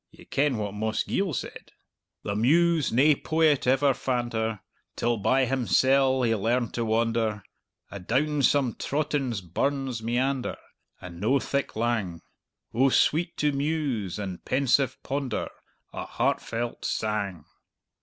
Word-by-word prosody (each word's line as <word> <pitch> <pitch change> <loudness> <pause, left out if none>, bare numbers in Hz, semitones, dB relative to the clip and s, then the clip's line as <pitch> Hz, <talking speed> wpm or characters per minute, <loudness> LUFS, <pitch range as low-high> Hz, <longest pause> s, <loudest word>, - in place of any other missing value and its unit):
Ye - - -17
ken 140 -3 +1
what 105 -2 -3
Mossgiel 110 - -1
said: 135 - -6 0.5
'The 100 - -3
Muse 160 +7 +3
nae 140 +6 +5
poet 155 -4 +2
ever 135 +2 +4
fand 125 -2 -2
her, 110 -2 -2 0.3
Till 120 0 0
by 130 +6 +2
himsel' 130 +1 +3
he 115 -2 +2
learned 115 +3 0
to 120 - -1
wander, 110 -2 0 0.5
Adown 135 +10 0
some 135 -3 +3
trottin' 145 -3 -1 0.2
burn's 135 -3 -1
meander, 125 +3 -1 0.4
And 85 -1 -10
no 130 +7 +3
thick 140 +1 -2
lang; 110 -7 -1 0.5
Oh 130 +4 +4
sweet 165 +5 +2
to 150 0 +2
muse 140 - -2
and 95 -4 -6
pensive 130 -1 +1
ponder 135 -4 -2 0.4
A - - -5
heartfelt 120 +1 -2
sang.'" 100 -7 -2
125 Hz, 125 wpm, -26 LUFS, 110-140 Hz, 0.5 s, nae